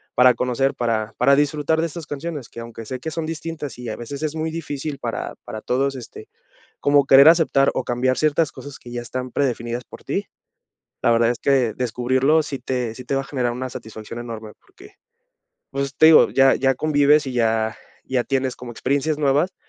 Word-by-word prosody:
para 125 0 +6
conocer, 125 +2 0
para 115 -2 -1
para 140 +3 +5
disfrutar 150 +2 +1
de 165 - 0
estas 165 0 -8
canciones", 145 -3 -5
que 115 - -10
aunque 115 -1 -9
sé 130 +2 -5
que 160 +4 -5
son 165 0 -3
distintas, 160 -3 -6
y 125 - -6
a 110 - -4
veces 140 +5 -7
es 155 +1 -2
muy 160 0 -2
difícil 150 -3 -5
para - - -4
para 110 - -7
todos, 135 +2 0
este, 125 - -10 0.5
como 145 -1 +4
querer 140 +3 +8
aceptar, 160 -5 +4
o - - -1
cambiar 130 +1 0
ciertas 155 0 +1
cosas 145 -1 -10
que 120 - -12
ya 120 - -3
están 125 +1 -5
predefinidas 120 -3 -2
por - - -14
ti. - - -2 0.8
La 120 - +3
verdad 115 0 +3
es 120 - -2
que, 130 -5 +2
descubrirlo 130 +5 +1
sí 140 -2 -5
te 125 -3 -3
sí 125 - -10
te - - -1
va 135 - 0
a - - -11
generar 125 -4 -1
una 130 +1 -5
satisfacción 110 +1 -8
enorme 110 -2 -7
porque, 400 +1 -18 0.8
pues, 140 0 -3
te 160 - +6
digo, 160 - +7
ya 135 0 +5
ya 135 0 +2
convives, 145 0 +3
y 130 - -4
ya 110 -1 +1 0.3
ya 130 -2 0
tienes 130 -1 -1
como 125 -1 -8
experiencias 140 +6 -1
nuevas 145 +6 +2
135 Hz, 200 wpm, -22 LUFS, 120-145 Hz, 0.8 s, querer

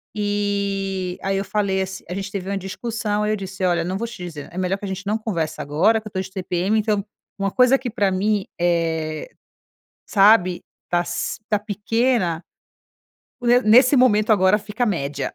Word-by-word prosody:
eh, 200 -3 -1
aí, 195 0 0
eu 195 - -2
falei 195 -2 0
ass 190 0 -5
a - - -3
gente 195 +1 -5
teve 195 -1 -4
uma 200 - -1
discussão, 210 +2 -3
aí, 210 - 0
eu - - +1
disse: 195 -1 -6
"Olha, 175 -2 +2
não 185 +3 -2
vou 235 +3 -3
te 220 -6 -9
dizer 155 -5 -7
é 175 - -10
melhor 185 +1 0
que 200 - -7
a - - -4
gente 190 +1 -5
não 210 +2 0
converse 170 -8 -3
agora 180 +11 +2
que 215 - -10
eu - - -10
tô 190 - -2
de 190 - -8
TPM, 190 +2 -1
então, 210 -1 0 0.4
uma 195 0 0
coisa 255 +3 +5
que 255 -1 -5
pra 205 -4 +1
mim, 200 +1 0
eh, 165 -3 0 0.8
sabe, 195 -3 +4 0.3
tá 175 0 +1
si - - -3
tá 210 - +2
pequena, 210 -3 0 1.0
o 245 - -7
ne 245 +1 +5
nesse 250 +5 +6
momento 225 -4 +4
agora, 190 -1 +4
fica 215 +3 -3
média, 145 -7 -2
195 Hz, 195 wpm, -22 LUFS, 185-215 Hz, 1.0 s, nesse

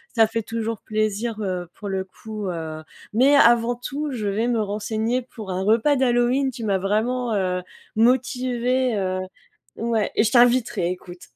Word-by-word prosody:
ça 225 -2 +5
fait 225 0 -3
toujours 225 -1 -4
plaisir, 215 +1 -1
heu, 180 -3 -3
pour 205 - -8
le 190 -1 -1
coup, 215 +2 -8
heu, 160 -2 -5 0.3
mais 265 +6 +5
avant 235 -2 +5
tout, 280 +4 -4
je 220 -5 -3
vais 215 +4 0
me 235 -3 +1
renseigner 220 +4 -1
pour 220 -5 -10
un 185 +1 -2
repas 230 +8 +3
d'Halloween. 255 +1 +2
Tu 235 -2 -8
m'as 200 -2 +2
vraiment, 225 +4 0
heu, 180 -2 0 0.3
motivée, 250 +1 +1
heu, 185 -1 -1 0.6
ouais 225 -2 0
et - - +4
je 220 - +1
t'inviterai, 240 -7 +3
écoute! 180 -1 -9
225 Hz, 165 wpm, -23 LUFS, 200-245 Hz, 0.6 s, ça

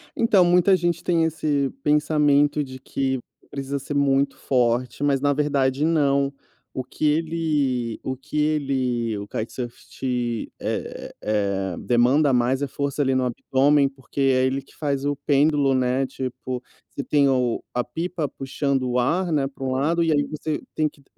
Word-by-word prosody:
Então, 205 -5 +4
muita 180 +2 +5
gente 170 -1 -1
tem 170 -2 +2
esse 150 -3 0
pensamento 150 -1 +3
de 130 -1 -9
que 130 0 -2 0.3
precisa 140 0 -4
ser 140 +2 -5
muito 140 0 +2
forte, 125 0 0
mas, 140 -2 +2
na 145 0 +3
verdade, 140 -1 +1
não. 140 -4 +2 0.4
O 130 - -2
que 130 +4 -4
ele 150 -7 0
o 130 -1 -3
que 150 +3 -11
ele 130 -6 0
o 100 - -7
kitesurf 120 +3 -5
te 120 -3 -3
é - - -4
é 100 -3 -1
é - - -12
demanda 130 +4 +3
mais 125 +3 +2
é 140 - 0
força 140 +1 -3
ali 135 -1 +1
no 130 -1 +1
abdômen, 135 +3 +2
porque 135 0 -10
é 130 -1 +3
ele 135 +1 -1
que - - -22
faz 140 -2 -2
o 145 0 0
pêndulo, 145 -1 +2
né? 130 +1 +1
Tipo, 130 -1 -5 0.3
você 140 - -5
tem 140 +1 +3 0.5
a 125 - +1
pipa 165 +4 -3
puxando 135 -1 -2
o 125 - 0
ar, 170 +8 +1
né, 145 -3 +2
para 135 0 -10
um 130 - -1
lado, 155 +6 +1
e 165 - +2
aí 145 -1 +3
você 155 0 -3 0.2
tem 155 -1 +1
que 145 - -24
140 Hz, 170 wpm, -23 LUFS, 130-150 Hz, 0.5 s, muita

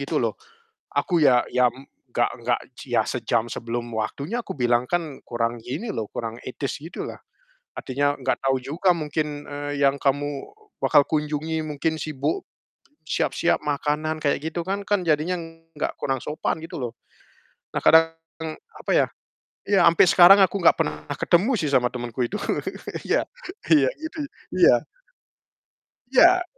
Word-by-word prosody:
gitu - - -2
loh, - - 0 0.6
aku 175 -4 +1
ya 125 -3 +5
ya 125 -1 +4
m 130 +3 -10 0.3
nggak - - +2
nggak - - +1 0.2
ci - - -6
ya - - +5
sejam 120 0 -1
sebelum 120 +1 -4
waktunya 140 - -3
kubilang 120 -2 +1
kan 165 -5 -2
kurang 120 0 -1
gini 135 - -5
loh, 110 -3 -3
kurang 115 0 -5
etis 135 +2 -4
gitu 165 +3 -6
lah. - - -8 0.6
Artinya 145 +2 0
nggak 130 -1 -1
tahu 135 0 +3
juga 160 +8 +1
mungkin, 150 -1 -3
eee, 145 0 -4
yang 135 - +4
kamu 145 0 -1 0.3
bakal 145 - +5
kunjungi 155 +1 -1
mungkin 155 +2 -1
sibuk, 155 - -2 0.7
siap-siap 170 - +1
makanan 150 +2 -1
kayak 145 - +2
gitu 170 - -2
kan 195 +3 -3
kan 205 -2 +1
jadinya 160 +1 +1 0.4
nggak - - -2
kurang 135 -2 -1
sopan 155 +1 -2
gitu 165 - -7
loh. 120 -2 -3 0.8
Nah, - - 0
kadang, 165 0 +6 0.6
apa - - -5
ya, - - +4 0.6
ya 195 -3 +4
sampai 170 +2 +6
sekarang 185 +4 +8
aku 190 +1 +1
nggak 170 - +7
pernah 75 - 0 0.2
ketemu 185 +9 +2
sih 150 - 0
sama 125 -3 +3
temenku 120 0 -2
itu. 165 - -4 0.7
Iya - - +2 0.5
iya, 140 -4 +6
gitu, 320 0 -6 0.4
iya. - - +6 1.3
Iya. 355 +6 +6
145 Hz, 150 wpm, -24 LUFS, 130-165 Hz, 1.3 s, sekarang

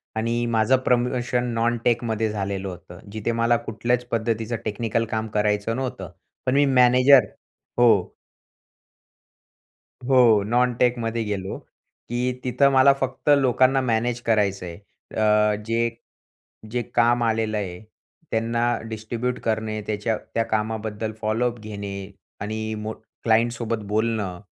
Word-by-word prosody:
आणि 115 +2 0
माझं 110 +4 +4
प्रमोशन 125 0 +1
नॉनटेकमध्ये 115 -1 0
झालेलं 100 -2 -3
होतं. 90 0 -10
जिथे 110 +2 -2
मला 115 +1 +2
कुठल्याच 120 +2 -1
पद्धतीचं 115 0 -1
टेक्निकल 115 +2 -1
काम 110 0 -1
करायचं 105 +1 0
नव्हतं. 125 -9 -4 0.3
पण 130 - +1
मी 145 0 +5
मॅनेजर 125 -1 +6 0.5
हो. 110 -6 +4 1.9
हो, 125 -5 +5
नॉनटेकमध्ये 120 0 +1
गेलो, 100 -3 -4 0.5
की 125 +1 0
तिथं 140 +2 +3
मला 135 +1 +6
फक्त 135 +1 -3
लोकांना 130 0 +3
मॅनेज 120 0 0
करायचं 100 -5 +1
आहे 85 - -7 0.4
अ, 105 -1 +3
जे 115 +1 +1 0.8
जे 120 0 0
काम 120 0 +3
आलेलं 110 -1 0
आहे 90 -3 -4 0.5
त्यांना 115 +1 0 0.3
डिस्ट्रीब्यूट 115 +3 -3
करणे, 110 -1 -1
त्याच्या 110 +1 -1 0.2
त्या 115 - +1
कामाबद्दल 110 0 -2
फॉलोअप 115 +2 0
घेणे 100 -2 -6 0.5
आणि 110 +1 -3
मोठ 110 +1 -5 0.3
क्लायंटसोबत 115 -1 +1
बोलणं 105 -4 -1
115 Hz, 115 wpm, -23 LUFS, 110-120 Hz, 1.9 s, मॅनेजर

